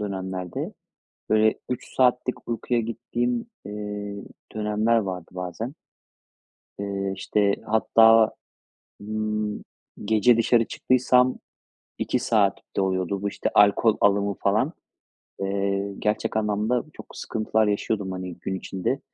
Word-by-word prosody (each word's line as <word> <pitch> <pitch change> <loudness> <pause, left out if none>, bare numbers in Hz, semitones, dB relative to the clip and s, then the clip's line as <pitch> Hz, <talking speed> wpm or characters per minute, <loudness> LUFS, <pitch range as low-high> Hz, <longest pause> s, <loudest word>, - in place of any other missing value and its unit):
dönemlerde, 95 -3 -4 0.6
böyle, 110 0 +4 0.2
3 125 - -5
saatlik 125 0 +1
uykuyla 115 +1 0
gittiğim, 120 - -2 0.2
eee, 105 0 -5 0.4
dönemler 110 +2 +2
vardı 95 -5 -3
bazen. 90 +8 -5 1.1
Eee, 100 -1 -2
işte, 100 +1 +1
hatta, 110 0 +5 0.7
ımm, 105 0 -2 0.4
gece 110 +3 +4
dışarı 115 0 +3
çıktıysam 130 0 +3 0.6
2 - - 0
saat 110 -5 +2 0.2
de - - +2
oluyordu 95 0 -1
bu, 100 - 0
işte, - - -2
alkol 105 +2 +5
alımı 100 0 +3
falan. - - +1 0.7
Eee, 100 0 -1
gerçek 105 +1 0
anlamda 110 +3 +1
çok - - -10
sıkıntılar 110 0 0
yaşıyordum, 100 -1 -1
hani, 90 -1 -5
gün 95 - -4
içinde. 95 +7 -2
105 Hz, 110 wpm, -25 LUFS, 100-115 Hz, 1.1 s, hatta